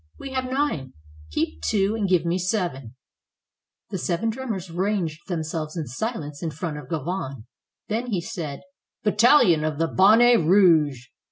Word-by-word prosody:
"We 275 - -8
have 260 -1 -1
nine. 255 - -1 0.4
Keep 80 +1 -2
two, 195 - +1
and 205 -4 -1
give 180 -2 +3
me 170 +2 0
seven." 175 - -2 1.0
The 190 - -3
seven 175 +6 -1
drummers 220 -8 -5
ranged 175 -3 -2
themselves 160 -2 -4
in 160 - -2
silence 150 - -5
in 165 - -2
front 155 0 -5
of 135 -3 -12
Gauvain. 150 - -4 0.4
Then 230 +3 -2
he 205 -7 -1
said: 155 -4 -6 0.4
"Battalion 210 - +5
of 155 -1 -2
the 165 +1 +1
Bon 195 +6 +5
net 240 0 +6
Rouge!" 160 -7 +4
175 Hz, 155 wpm, -24 LUFS, 155-210 Hz, 1.0 s, net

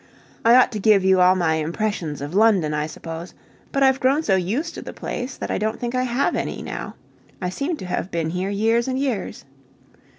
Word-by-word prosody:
I 230 +1 +6
ought 255 - +5
to 215 - -4
give 200 -2 +4
you 190 -1 +5
all 180 +1 +6
my 170 -3 +1
impressions 165 -2 -2
of 145 +3 -5
London, 195 -7 +3
I 150 0 -1
suppose; 165 +2 -8 0.4
but 275 - +1
I've 265 0 +4
grown 275 +4 +2
so 195 - +2
used 220 - -1
to - - -7
the - - -8
place 250 +1 -5
that - - -4
I - - -1
don't 220 +1 -2
think 240 0 -3
I 255 - +1
have 245 +2 0
any - - -3
now. - - -6 0.4
I 180 - -2
seem 285 - -3
to 185 - -8
have 180 0 -3
been 165 -3 -2
here 180 +2 -2
years 225 +4 +1
and 260 0 -1
years. 265 -7 -3
205 Hz, 220 wpm, -22 LUFS, 175-250 Hz, 0.4 s, I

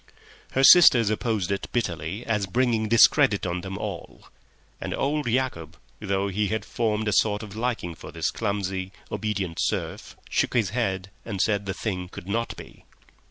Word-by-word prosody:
Her 135 - +2
sisters 125 - +8
opposed 110 -4 -1
it 100 - -2
bitterly 90 -2 -3
as 105 -3 0
bringing 115 0 +1
discredit 105 -3 +5
on 90 0 -2
them 95 +1 -6
all; 100 -5 -7 0.5
and - - -3
old 145 0 -1
Yacob, 110 - -2 0.2
though 100 -1 -1
he 100 +1 0
had 110 +2 -2
formed 110 -2 -1
a 105 - +1
sort 105 +1 +2
of 105 -1 -9
liking 115 -7 -2
for - - -11
his - - -1
clumsy, 95 -3 -3 0.2
obedient 100 -5 -3
serf, - - -3
shook - - 0
his 110 -6 +2
head 95 -5 -2
and 105 -4 -5
said 100 -1 +1
the 95 - -2
thing 90 -5 -4
could 90 - -10
not 115 +4 -2
be. - - -12
105 Hz, 165 wpm, -25 LUFS, 95-115 Hz, 0.5 s, sisters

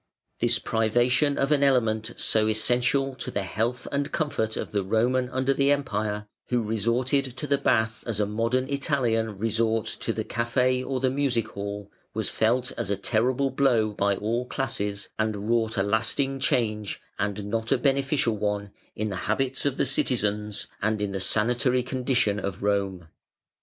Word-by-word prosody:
This - - +3
privation 120 +6 +2
of 135 +2 +1
an 145 -2 +4
element 115 -5 +2
so 110 -1 +2
essential 125 +5 +2
to 130 - -5
the 100 - -2
health 115 +5 -2
and 140 +1 -1
comfort 110 -8 -1
of - - -4
the 100 -2 0
Roman 125 +5 +1
under 130 +1 +1
the 140 +1 +2
Empire 105 -7 -1 0.2
(who 120 -2 +1
resorted 115 +6 +1
to - - -2
the 140 -1 +1
bath 110 -4 +1
as 110 -3 -1
a 105 - +3
modern 115 +5 0
Italian 120 -7 0
resorts 115 +1 0
to - - 0
the - - -2
café 125 +2 +1
or 130 0 -2
the 130 0 +1
music 130 -4 0
hall), 100 0 -6 0.2
was 110 -2 0
felt 120 +3 +1
as - - -2
a 100 - 0
terrible 125 +6 +1
blow 120 -6 +2
by 100 0 +1
all 115 +5 -2
classes, 105 -7 -2
and 110 -1 -1
wrought 115 -1 +1
a 95 - +3
lasting 115 +6 +1
change, 110 -7 0 0.2
and 100 0 -2
not 110 +2 -2
a 135 - +5
beneficial 135 -3 +1
one, 105 -1 -2 0.2
in 110 0 -2
the 95 - -4
habits 135 +5 0
of 140 - -2
the - - +2
citizens, 105 -6 0 0.2
and 110 +1 +1
in 105 -1 -2
the 95 - -3
sanitary 120 +6 +1
condition 125 -5 +1
of 100 -2 -4
Rome. 100 -4 0
115 Hz, 170 wpm, -26 LUFS, 105-130 Hz, 0.2 s, a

